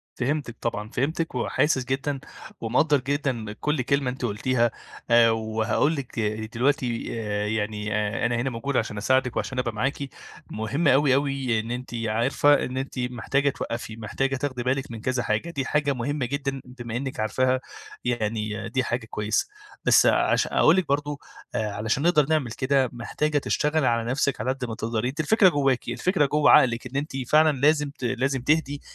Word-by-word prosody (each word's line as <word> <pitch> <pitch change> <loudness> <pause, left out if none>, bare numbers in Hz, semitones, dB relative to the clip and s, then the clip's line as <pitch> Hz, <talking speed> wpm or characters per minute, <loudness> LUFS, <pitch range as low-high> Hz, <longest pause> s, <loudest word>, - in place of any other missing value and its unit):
فهمتِك 135 -2 -2
طبعًا، 105 -2 -3
فهمتِك 160 +6 -1
وحاسس 130 +2 +1
جدًا 135 +2 -2 0.4
ومقدرّ 140 +6 +2
جدًا 130 -5 -2
كل 150 +5 -1
كلمة 140 0 +1
أنتِ 125 0 -6
قلتيها 120 +2 +1 0.4
آآ، 115 -1 +6
وهاقول 110 +6 0
لِك 135 -4 -7 0.4
دلوقتي 125 -1 0
آآ، 105 -1 -2
يعني 105 0 -2
آآ، 105 +1 0
أنا 120 0 0
هنا 125 +3 -1
موجود 125 +3 -3
عشان 110 -3 -1
أساعدِك 130 +3 +1
وعشان 130 - -2
أبقى 125 -2 -1
معاكِ، 130 +6 -1 0.5
مهم 135 +9 -1
أوي، 135 -1 +5
أوي 135 -4 0
إن 115 +2 -7
أنتِ 125 0 -5
عارفة 120 +6 +2
إن 125 - -5
أنتِ 135 0 -4
محتاجة 125 +3 0
توّقفي، 115 -4 -5
محتاجة 135 +5 -2
تاخدي 130 -2 -3
بالِك 130 +1 -1
من 115 -2 -7
كذا 125 +1 -1
حاجة، 110 +11 -1
دي 140 -5 -3
حاجة 145 +1 +1
مهمة 130 +2 -2
جدًا 135 +1 -3
بما 120 -2 -7
إنِك 135 -2 -4
عارفاها 130 +4 +1 0.4
يعني 110 -2 -2
دي 130 +3 0
حاجة 120 -1 -2
كويسة، 105 0 0 0.4
بس - - +6
عشا - - +3
أقول 160 - +6
لِك 185 -4 0
برضه 145 0 -1 0.4
آآ، 105 -2 -1
علشان 110 +6 -1
نقدر 155 -4 +4
نعمل 155 -6 +1
كده 130 0 +1
محتاجة 145 +5 -1
تشتغلي 150 +1 +1
على 115 -1 +1
نفسِك 140 +1 0
على 130 - 0
قد 135 -1 -5
ما 115 -2 -4
تقدري، 110 +1 -2
أنتِ 145 +5 -4
الفكرة 190 +5 +5
جواكِ، 135 -7 +1
الفكرة 150 +6 +1
جوّه 150 +2 +3
عقلِك، 120 -1 +5
إن 125 +2 -6
أنتِ 140 0 -3
فعلًا 155 0 +5
لازم 150 0 +3
ت 140 -2 -10
لازم 130 +2 0
تهدي 145 0 +1
130 Hz, 175 wpm, -25 LUFS, 115-140 Hz, 0.5 s, آآ